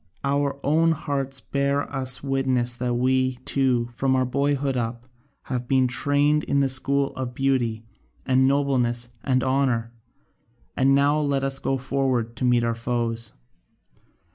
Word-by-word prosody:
Our 140 0 0
own 165 +3 +3
hearts 135 -3 -3
bear 140 +1 0
us 130 -1 +1
witness 130 -3 0
that 125 -1 -1
we, 130 +1 +1
too, 125 -3 +1
from 130 +2 0
our 130 0 +2
boyhood 140 +1 0
up, 120 0 -4 0.4
have 125 -2 -4
been 130 -1 +3
trained 145 +4 +2
in 140 - +1
the 135 -1 +2
school 140 +1 +1
of 125 -2 -6
beauty 120 -5 0 0.4
and 130 0 +3
nobleness 125 -4 0
and 130 -2 +1
honour, 130 -4 0 0.8
and 135 +1 +3
now 145 +2 +3
let 140 -2 0
us 135 0 +1
go 135 - -1
forward 130 -3 -1
to - - -4
meet 120 -1 +3
our 115 0 0
foes. 115 -1 -3
130 Hz, 145 wpm, -24 LUFS, 125-140 Hz, 0.8 s, own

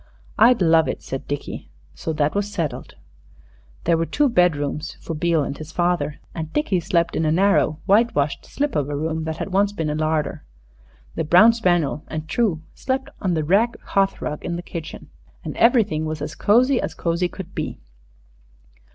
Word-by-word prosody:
"I'd 230 -2 +6
love 160 -1 +4
it," - - -4
said 135 - -6
Dickie. 145 0 -5 0.2
So 85 - -4
that 150 -1 +1
was 205 0 -1
settled. 170 -7 -4 0.9
There 170 - +3
were 165 - 0
two 290 -2 +2
bedrooms 155 - +1
for 165 - -6
Beale 165 0 +1
and 140 - -4
his 155 +1 -9
father, 175 -4 0
and 160 -1 -5
Dickie 295 - +1
slept 170 0 0
in - - 0
a 155 - +2
narrow, 175 -3 +2
whitewashed 195 -8 +2
slip 290 0 -2
of 145 -1 0
a 145 - -2
room 160 +2 -2
that 160 0 -3
had 195 - -5
once 200 +1 +3
been 160 -6 -2
a - - -1
larder. 155 - -1 0.7
The 165 - -2
brown 180 +9 +6
spaniel 175 -9 +1
and 155 0 -5
True 180 -6 0
slept 265 +1 -3
on 185 -4 0
the 155 - 0
rag 205 +9 +2
hearth 195 0 0
rug 150 - -4
in 170 - -3
the 175 - -5
kitchen. 165 -2 -8 0.3
And - - -5
everything 215 -10 +3
was 155 0 -3
as 150 +2 -5
cozy 250 +5 +3
as - - -4
cozy 170 +1 0
could 185 0 -9
be. - - -4
170 Hz, 185 wpm, -22 LUFS, 155-200 Hz, 0.9 s, I'd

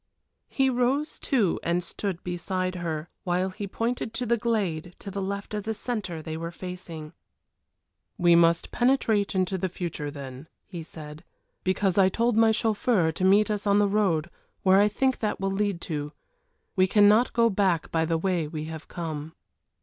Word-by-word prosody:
He 270 -1 +2
rose 260 +4 0
too 225 - +1
and 175 +1 0
stood 180 +1 -4
beside 185 +1 -2
her, 165 -3 -4 0.2
while 180 +1 0
he 205 +1 -5
pointed 230 +2 -2
to 250 - -2
the 235 +1 +3
glade 190 -8 -1
to 200 - -8
the 200 +1 -3
left 200 +2 -4
of 210 - -1
the 220 +2 -3
centre 200 -10 -4
they 160 0 -5
were 165 +1 -4
facing. 170 -3 -8 1.0
"We 175 -1 +5
must 170 0 +4
penetrate 230 -6 +2
into 185 0 0
the 185 - -1
future 170 -5 -4
then," 140 0 -8 0.2
he 175 -4 -7
said, 155 -1 -10 0.4
"because 190 0 +1
I 190 -1 +6
told 235 +3 +1
my 225 0 +5
chauffeur 215 -5 +2
to 175 - -4
meet 205 +3 +5
us 210 0 -2
on 200 0 +4
the 205 0 +4
road 190 -5 +1 0.3
where 190 0 +6
I 205 - +5
think 260 +5 0
that 215 - -1
will 195 0 -1
lead 200 -2 0
to. 150 -2 -4 0.6
We 185 -1 +4
cannot 210 +4 +5
go 230 -1 +3
back 190 -5 +1
by 165 0 +1
the 165 0 +1
way 175 -2 0
we 155 0 -5
have 160 0 -7
come." 160 -2 -5
185 Hz, 180 wpm, -26 LUFS, 165-210 Hz, 1.0 s, I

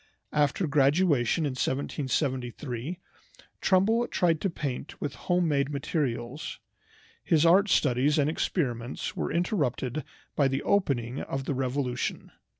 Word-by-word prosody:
After 150 +5 +2
graduation 145 -1 +3
in 145 - 0
1773 130 +1 -2 0.6
Trumbull 220 +6 +3
tried 165 -3 +1
to 195 - +1
paint 145 -5 -5
with 140 - -3
home 180 -2 0
made 140 -2 +1
materials. 140 -2 -3 0.7
His 160 -1 +3
art 195 +5 +5
studies 140 +1 +3
and 145 -1 +3
experiments 130 -6 -2
were - - -2
interrupted 155 - -1 0.3
by 140 - +3
the 135 0 -1
opening 135 - +1
of 135 0 -4
the 145 - -1
Revolution. 130 -1 -2
145 Hz, 120 wpm, -28 LUFS, 130-165 Hz, 0.7 s, art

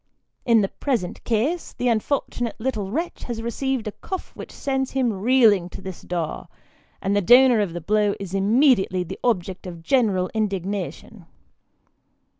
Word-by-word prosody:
In 230 -2 +5
the 195 - +1
present 225 -9 -3
case, 255 +10 -1
the 245 - -2
unfortunate 240 0 -1
little 220 -5 -2
wretch 325 - -3
has 230 -2 -5
received 255 +1 -2
a - - -2
cuff 375 - -6
which - - -9
sends 265 -1 -2
him 255 -4 +1
reeling 210 -3 +4
to - - -9
the 190 0 -6 0.2
door; 170 -3 -3 0.6
and 200 +1 +1
the 205 - +3
donor 245 +3 +6
of 200 -5 -1
the 175 - -5
blow 205 +3 +1
is 195 -2 -7
immediately 195 -2 +3
the 175 - -8
object 190 -5 -1
of 170 -2 -9
general 200 -7 +2
indignation. 200 -2 -3
215 Hz, 155 wpm, -23 LUFS, 190-250 Hz, 0.6 s, donor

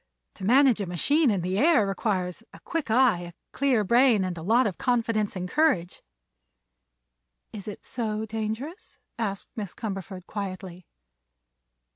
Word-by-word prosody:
To 195 - -11
manage 255 -1 +5
a 195 - -3
machine 285 - +2
in 200 -4 +1
the 185 +3 -1
air 295 -7 +5
requires 195 -2 -2
a - - -12
quick 330 -8 -3
eye, 240 -4 +4
a 175 0 -8 0.2
clear 260 -6 +2
brain 235 0 +4
and 180 -1 -3
a 165 - -7
lot 230 +9 +3
of 195 -5 -3
confidence 230 -4 0
and 180 -1 -3
courage." 230 - +1 1.5
"Is 205 -1 -8
it 210 - -8
so 220 -2 -3
dangerous?" 225 - -5 0.2
asked 200 -3 -3
Miss 205 -5 -6
Cumberford 195 -4 -6
quietly. 185 -3 -6
215 Hz, 145 wpm, -26 LUFS, 185-245 Hz, 1.5 s, manage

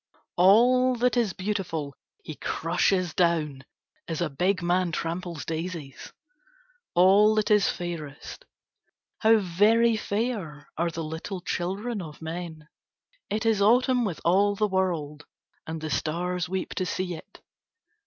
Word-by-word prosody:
"All 245 +7 +5
that 245 +1 +1
is 230 -5 +1
beautiful 185 -8 -3 0.3
he 155 - -7
crushes 175 +3 0
down 155 -6 0 0.4
as 165 -2 -3
a 170 -4 -1
big 180 +6 0
man 175 0 +1
tramples 165 -3 -4
daises, 160 -3 -6 0.8
all 200 +4 +6
that 215 0 +1
is 210 -2 +4
fairest. 170 - -6 0.7
How 225 0 +5
very 215 +5 +3
fair 205 - -3
are 170 +1 0
the 165 0 -5
little 160 +5 -5
children 195 +6 -3
of 155 -4 -9
men. 160 -1 -7 0.6
It 215 +2 -2
is 220 -3 +2
autumn 250 +4 +4
with 190 -7 -3
all 200 +4 +3
the 210 +1 +1
world, 165 -6 -2 0.4
and 160 0 -4
the 155 0 -5
stars 175 +4 -2
weep 190 0 -3
to 185 - 0
see 185 +1 -2
it. 160 - -12
180 Hz, 135 wpm, -26 LUFS, 160-210 Hz, 0.8 s, all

